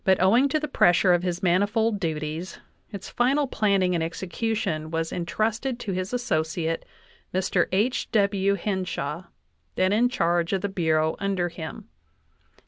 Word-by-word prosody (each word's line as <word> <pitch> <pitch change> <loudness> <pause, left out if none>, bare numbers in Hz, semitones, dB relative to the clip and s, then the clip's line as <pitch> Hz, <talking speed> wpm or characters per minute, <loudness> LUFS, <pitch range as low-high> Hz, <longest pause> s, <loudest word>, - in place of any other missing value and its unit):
owing 230 +9 +4
to 310 - +1
the 300 - -3
pressure 180 - +4
of 175 - +2
his 180 0 -3
manifold 205 +4 +2
duties, 160 0 -3 0.3
its 200 -3 -7
final 275 +4 +1
planning 200 -7 +1
and 170 -2 0
execution 170 -1 -2
was 165 0 -2
intrusted 220 +8 -2
to 205 - -4
his 185 +1 -3
associate, 165 -8 -1 0.5
Mr. 180 -1 +1
H. 215 +7 0
W. 200 -2 +2
Hen 190 0 -2
shaw, 165 0 -4 0.5
then 185 +1 +2
in 240 +4 +3
charge 170 -6 0
of 190 - 0
the 200 - -2
Bureau 160 -4 +1
under 195 -3 0
him. 165 -1 -8
185 Hz, 145 wpm, -25 LUFS, 170-215 Hz, 0.5 s, owing